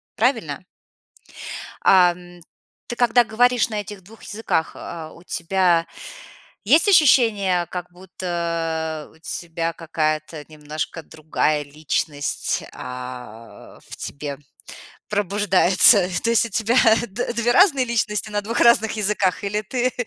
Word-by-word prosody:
правильно? 215 - -1 1.2
Ам, 175 -1 +3 0.5
ты, 240 - -5
когда 245 0 +4
говоришь 240 +2 +2
на 210 -2 -3
этих 205 -1 -10
2 220 +5 -17
языках, 205 -6 -2
а, 160 -2 -8
у 170 - -16
тебя 175 -1 +1 0.8
есть 305 - +4
ощущение, 225 - +4
как 180 -1 -7
будто 170 -4 -4
у - - -21
тебя 165 0 -4
какая-то 155 -2 -3
немножко 155 +1 -6
другая 155 -1 -1
личность, 145 0 -3
а, 125 -3 -9
в - - -9
тебе 140 -1 -6 0.7
пробуждается? 200 -1 +4
То 230 - +1
есть 230 0 +3
у - - -10
тебя 225 +4 0 0.3
д 225 +5 -3
две 235 +1 +1
разные 300 -6 +4
личности 215 -3 -1
на 205 0 -1
2 230 +3 -2
разных 225 -2 +4
языках, 205 -3 -1
или 210 +1 -2
ты 250 +4 -1
185 Hz, 120 wpm, -21 LUFS, 160-225 Hz, 1.2 s, когда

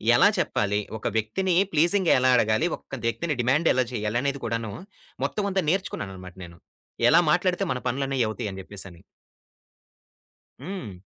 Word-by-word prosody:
ఎలా - - +6
చెప్పాలి? 105 0 0 0.2
ఒక 110 - -4
వ్యక్తిని 175 - 0 0.2
ప్లీజింగ్‌గా 175 +4 +3
ఎలా 130 0 +4
అడగాలి? 110 +5 +2
ఒక 135 - -9
వ్యక్తిని 150 +7 -1
డిమాండ్ 140 +7 +2
ఎలా 130 - +2
చేయాలనేది 120 +6 -1
కూడాను 115 -1 -2 0.5
మొత్తం 205 -1 -2
అంతా 190 -1 +1
నేర్చుకున్నానన్నమాట 95 - -3
నేను. 85 0 -14 0.5
ఎలా 165 - +7
మాట్లాడితే 180 +1 +1
మన 125 - -4
పనులన్నవి 135 -1 0
అవుతాయని 105 -4 -5
జెప్పేసని. 95 -3 -10 1.6
హ్మ్. 150 - -6
125 Hz, 130 wpm, -25 LUFS, 105-170 Hz, 1.6 s, ఎలా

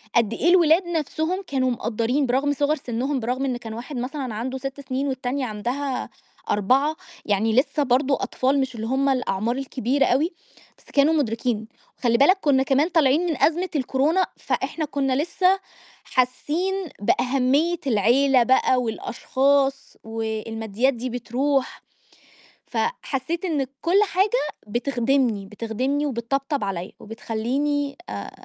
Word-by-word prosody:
قد 230 -2 +3
إيه 335 - +1
الولاد 345 0 +5
نفْسهم 330 +3 -2
كانوا 260 -2 +1
مقدَّرين 235 +4 0
برغم 265 +3 +1
صِغَر 290 +2 +1
سنهم 265 +1 -2
برغم 250 +3 -1
إن 255 -2 -1
كان 225 -2 -8
واحد 245 +6 -7
مثلًا 255 0 -4
عنده 255 +4 -3
6 270 +1 -6
سنين 265 +1 -2
والتانية 260 0 -2
عندها 250 +5 -3 0.4
4، 265 +9 +2 0.3
يعني 215 +2 +1
لسه 280 +4 +2
برضو 265 +2 +2
أطفال 260 +2 0
مش 265 -2 -2
اللي 225 0 -4
هُم 270 +3 +1
الأعمار 235 -3 0
الكبيرة 270 0 0
أوي، 295 +9 +2 0.5
بس - - -22
كانوا 290 +3 +4
مدركين، 230 -5 -1 0.3
وخلّي 235 -2 +2
بالك 330 +9 +5
كنّا 270 -3 +3
كمان 275 +3 +2
طالعين 315 0 +3
من 325 -5 -1
أزمة 350 +4 +2
الكورونا، 290 +7 +2
فإحنا 315 - -2
كنّا 275 -2 -1
لسه 370 +3 +2 0.4
حاسّين 295 +9 0 0.3
بأهمية 275 +9 +2
العيلة 250 +4 +4
بقى 255 0 +3
والأشخاص 270 +4 0
والماديات 225 +2 -2
دي 250 +1 -4
بترُوح، 255 +3 -1 0.8
فحسيت 335 - -2
إن 295 -7 0
كل 350 +4 +3
حاجة 390 +1 +1 0.4
بتخدمني، 240 -2 0
بتخدمني 230 +8 -2
وبتطبطب 275 +2 -2
عليَّ 190 -1 -4
وبتخلّيني 265 +6 -2
آآ - - -6
265 Hz, 130 wpm, -23 LUFS, 235-290 Hz, 0.8 s, الولاد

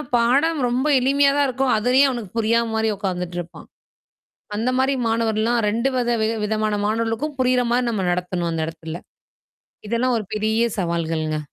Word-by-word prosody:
பாடம் 275 +7 +2
ரொம்ப 255 +4 0
எளிமையா 275 +2 +3
தான் 285 -1 +3
இருக்கும். 260 0 0
அதுலயே 250 +5 +4
அவனுக்கு 235 -6 -5
புரியாத 230 +1 +2
மாரி 220 0 +1
உட்காந்துட்டு 180 -3 -3
இருப்பான். 170 -1 -9 0.9
அந்த 235 +4 0
மாரி 265 +1 +2
மாணவர்லாம் 225 +1 +1
2 235 +5 0
வித 240 -1 +1
வி 220 - +2 0.2
விதமான 215 0 0
மாணவர்களுக்கும் 230 +7 -2
புரியிற 250 -1 +2
மாரி 245 0 +1
நம்ம 195 -5 -1
நடத்தணும் 180 -1 -2
அந்த 165 -1 -2
இடத்துல. 165 +1 -7 0.9
இதெல்லாம் 240 +1 +1
ஒரு 215 - -5
பெரிய 220 +2 +1 0.2
சவால்கள்ங்க? 165 -3 -1
225 Hz, 150 wpm, -22 LUFS, 185-250 Hz, 0.9 s, அதுலயே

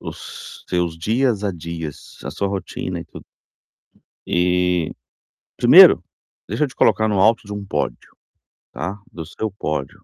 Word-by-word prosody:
os - - -9
seus 90 -2 -1
dias 115 +3 +1
a 100 - 0
dias, 85 -3 -8
a - - -5
sua 100 +6 -2
rotina 95 -2 -4
e - - -8
tudo. - - -13 1.0
Eh, 90 -1 +1 0.7
primeiro, - - +8 0.5
deixa 110 +9 -2
eu 145 - -1
te 130 - -16
colocar 110 0 +3
no 100 -3 +1
alto 110 +3 +4
de 105 - -8
um 105 -1 -5
pódio, - - -4 0.6
tá, 90 +9 -5
do 80 - -7
seu 105 +6 -4
pódio. 75 -8 -4
90 Hz, 150 wpm, -21 LUFS, 85-105 Hz, 1.0 s, primeiro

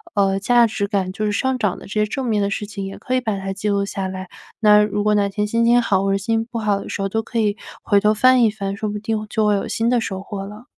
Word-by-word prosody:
呃， 195 -1 +2
价 240 +3 +4
值 205 -2 -2
感 195 -3 -1
就 215 +2 -2
是 210 - 0
上 260 +5 0
涨 205 -6 -1
的 - - -12
这 - - -8
些 210 0 +2
正 260 +5 -4
面 215 -3 +1
的 200 - 0
事 210 - -3
情 200 -1 -6
也 195 - -7
可 255 - -2
以 255 - +1
把 215 -4 -2
它 195 0 -4
记 205 +2 -3
录 200 0 +1
下 195 -1 -4
来。 185 0 -6 0.3
那 210 -1 +6
如 210 0 -1
果 210 0 +2
哪 205 -1 +2
天 210 +1 -2
心 230 +2 +1
情 240 +1 +5
好 195 -5 +1
或 195 - +1
者 195 - +2
心 225 +3 -1
情 225 - -5
不 230 - -3
好 210 -2 +1
的 - - -8
时 - - -4
候， 195 - 0
都 225 +2 -1
可 230 0 -3
以 210 -2 +1 0.3
回 205 -2 +3
头 210 +1 +3
翻 255 +3 +5
一 220 - +4
翻， 200 -2 -4
说 215 - -3
不 210 0 -4
定 215 0 -2
就 215 -1 +1
会 210 - +3
有 200 - -2
新 230 +1 0
的 245 -1 +3
收 190 -3 -4
获 195 -1 -6
了。 210 +4 -11
210 Hz, 340 characters per minute, -20 LUFS, 200-225 Hz, 0.3 s, 那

